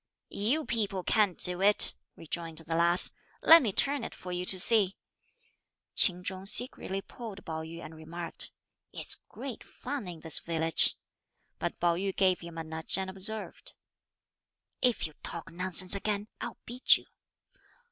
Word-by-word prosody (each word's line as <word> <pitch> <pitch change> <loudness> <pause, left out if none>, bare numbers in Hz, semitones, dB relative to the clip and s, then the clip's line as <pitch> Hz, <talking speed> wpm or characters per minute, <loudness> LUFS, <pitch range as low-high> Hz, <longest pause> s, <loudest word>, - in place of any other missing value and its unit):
"You 265 +10 0
people 205 -5 -2
can't 205 -2 +2
do 180 +1 -3
it," 205 +1 +6 0.2
rejoined 165 0 -5
the 165 0 -5
lass, 170 +2 +5 0.3
"let 330 +1 +9
me 225 -7 -1
turn 280 +5 0
it - - -7
for 180 - -9
you 180 0 -3
to 190 - +4
see." 200 -1 +4 1.0
Ch'in 180 -2 +4
Chung 190 +1 -5
secretly 200 -3 +2
pulled 220 -5 -10
Pao 160 -2 -5
yü 165 +1 -9
and 160 - -10
remarked, 165 +2 -6 0.4
"It's - - 0
great 265 -4 -4
fun 260 -5 -7
in 170 -3 -9
this 160 -2 -2
village!" 165 -1 +2 0.6
but - - -4
Pao 170 0 +2
yü 195 +1 -3
gave 185 -2 +2
him 170 -1 -11
a 165 - -4
nudge 160 +2 -2
and 190 -1 -4
observed, 210 +3 -3 1.1
"If 250 -2 +1
you 155 - -7
talk 170 +1 -7
nonsense 180 +1 +3
again, 205 +1 -3
I'll - - -6
beat 245 +2 +4
you." - - -16
185 Hz, 155 wpm, -29 LUFS, 170-210 Hz, 1.1 s, let